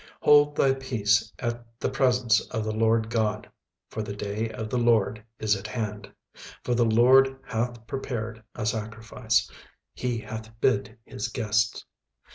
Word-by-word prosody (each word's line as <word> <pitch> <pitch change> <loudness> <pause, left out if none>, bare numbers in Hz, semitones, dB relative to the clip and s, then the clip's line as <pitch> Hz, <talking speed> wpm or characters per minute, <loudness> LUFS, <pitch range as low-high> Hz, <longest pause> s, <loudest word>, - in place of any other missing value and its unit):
36:001:007 - - -20
Hold 145 0 +6
thy 135 -1 +3
peace 110 -5 +1
at 120 -1 -5
the - - 0
presence 125 -5 +3
of 110 - -2
the 110 - -2
Lord 110 +1 +1
GOD: 110 -3 0 0.4
for 110 - -5
the 105 -1 -5
day 105 +2 -3
of 110 -1 -5
the 125 - +1
LORD 110 -2 +2
is 110 -1 +2
at 100 +2 -6
hand: 105 -2 -5 0.5
for 125 - 0
the 120 -1 +3
LORD 130 +4 +5
hath 120 -1 -3
prepared 115 -4 -4
a - - -3
sacrifice, 110 +1 -1 0.5
he 125 -2 -2
hath 110 0 -8
bid 110 -5 +1
his 105 - -4
guests. 110 -2 0
115 Hz, 155 wpm, -26 LUFS, 110-125 Hz, 0.5 s, Hold